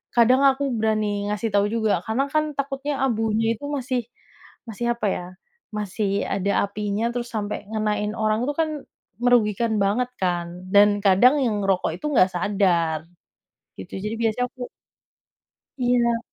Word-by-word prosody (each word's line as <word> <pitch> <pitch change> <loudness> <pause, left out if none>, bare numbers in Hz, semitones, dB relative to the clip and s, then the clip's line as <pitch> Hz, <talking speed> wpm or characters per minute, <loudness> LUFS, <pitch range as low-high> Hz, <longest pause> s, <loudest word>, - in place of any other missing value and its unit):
kadang 250 +3 +5
aku 275 +1 +1
berani 215 -2 0
ngasih 210 +2 -1
tau 200 0 +4
juga 220 -5 +1
karena 235 +5 0
kan 305 -1 +1
takutnya 280 +1 -2
abunya 225 -1 +1
itu 285 - -7
masih 255 -3 -1 0.7
masih 235 +2 -3
apa 235 -3 -2
ya, 180 - -3 0.5
masih 205 -1 -1
ada 200 0 -1 0.2
apinya 210 +2 -2
terus 240 0 -4
sampai 210 -1 -3
ngenain 210 -1 -1
orang, 215 +1 +1
itu 290 - 0
kan 315 - 0 0.5
merugikan 230 -2 +3
banget 240 +5 +1
kan? 175 -2 0 0.3
Dan 205 +1 +7 0.2
kadang 220 +9 +6
yang 210 -4 0
ngerokok 190 -4 +1
itu - - -9
nggak 185 -8 +5
sadar, 175 -4 +1 0.8
gitu. 95 - -9
Jadi 210 +3 -3
biasanya 225 +2 +1
aku 255 - -11 1.2
iya. 245 -2 +2
220 Hz, 145 wpm, -23 LUFS, 205-245 Hz, 1.2 s, Dan